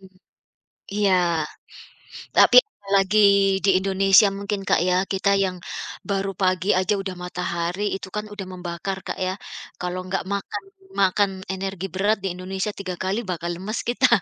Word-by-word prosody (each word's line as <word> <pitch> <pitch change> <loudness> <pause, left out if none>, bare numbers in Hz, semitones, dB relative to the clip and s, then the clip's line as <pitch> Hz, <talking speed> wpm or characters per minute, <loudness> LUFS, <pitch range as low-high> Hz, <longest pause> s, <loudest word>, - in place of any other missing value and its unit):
Mhm. 190 - -15 0.9
Iya, 205 -2 +3 1.2
tapi - - +7 0.4
lagi 195 +2 +3 0.5
di - - +4
Indonesia 195 +1 +5
mungkin, 200 0 -3
Kak, - - +4
ya 180 - +3 0.2
kita 195 +1 +2
yang 185 -1 -2 0.5
baru 195 0 0
pagi 185 +1 +2
aja 185 +2 +1
udah 190 -1 -5
matahari 180 +1 -3
itu 195 - -7
kan 210 0 -2
udah 200 -2 -6
membakar, 180 +1 -4
Kak, - - -3
ya 185 - -1 0.5
kalau 180 0 -3
nggak 190 +1 -1
makan 200 -1 -4 0.3
makan 195 +1 +3 0.2
energi 190 0 -4
berat 205 +3 +2
di 195 - 0
Indonesia 190 +3 -3
3 185 -3 -5
kali 190 +4 0
bakal 170 0 -3
lemes 195 +6 -4
kita. 255 +2 +4
190 Hz, 150 wpm, -23 LUFS, 185-200 Hz, 1.2 s, tapi